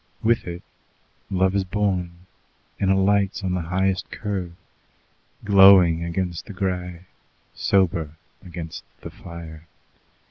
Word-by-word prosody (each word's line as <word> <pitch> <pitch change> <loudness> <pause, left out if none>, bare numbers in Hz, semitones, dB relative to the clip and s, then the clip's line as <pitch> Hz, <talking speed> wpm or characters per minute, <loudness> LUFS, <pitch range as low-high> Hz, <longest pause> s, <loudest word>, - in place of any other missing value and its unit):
With 115 -2 +2
it 85 +1 -6 0.7
love 95 0 +1
is 100 - +2
born, 90 -3 -2 0.5
and 95 - +1
alights 100 +1 +2
on 90 -1 -1
the 90 - -1
highest 95 +2 -1
curve, 95 -5 -4 0.9
glowing 95 -4 +7
against 85 -1 -3
the - - -8
grey, 90 -2 -3 0.5
sober 85 -5 +1 0.3
against 85 -3 -8 0.2
the - - -8
fire. 85 -2 -11
90 Hz, 110 wpm, -23 LUFS, 85-95 Hz, 0.9 s, glowing